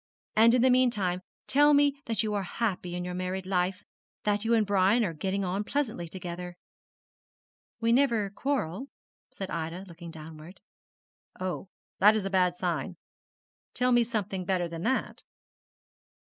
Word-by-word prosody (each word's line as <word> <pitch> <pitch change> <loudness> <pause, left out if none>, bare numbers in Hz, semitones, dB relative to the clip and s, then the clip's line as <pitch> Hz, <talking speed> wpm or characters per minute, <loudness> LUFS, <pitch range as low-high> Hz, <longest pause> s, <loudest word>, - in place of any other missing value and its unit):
And 230 +2 +6
in 250 - +3
the 260 - +5
meantime 210 -8 +2 0.2
tell 290 +2 +5
me 285 -1 +3
that 225 -2 0
you 215 -1 -1
are 205 - 0
happy 185 -3 -2
in 180 0 -3
your 180 - -4
married 185 +1 -3
life, 185 0 0 0.4
that 205 0 +1
you 230 +1 +3
and 220 -2 +3
Brian 200 +3 +3
are 170 - -2
getting 190 +5 -2
on 190 +3 -1
pleasantly 225 -8 -2
together.' 180 0 -6 1.2
'We 230 0 +2
never 235 -6 +3
quarrel,' 260 - -2 0.4
said 195 -1 -6
Ida, 165 +3 -4
looking 170 -1 -10
downward. 160 +2 -10 0.8
'Oh, 185 0 -4 0.3
that 210 +3 +7
is 210 -3 -1
a 195 - -2
bad 180 -2 +3
sign. 175 -2 -2 0.8
Tell 250 0 +2
me 240 -1 +5
something 205 -5 -3
better 180 -1 0
than 165 -1 -7
that.' 260 +8 -1
195 Hz, 155 wpm, -29 LUFS, 180-230 Hz, 1.2 s, that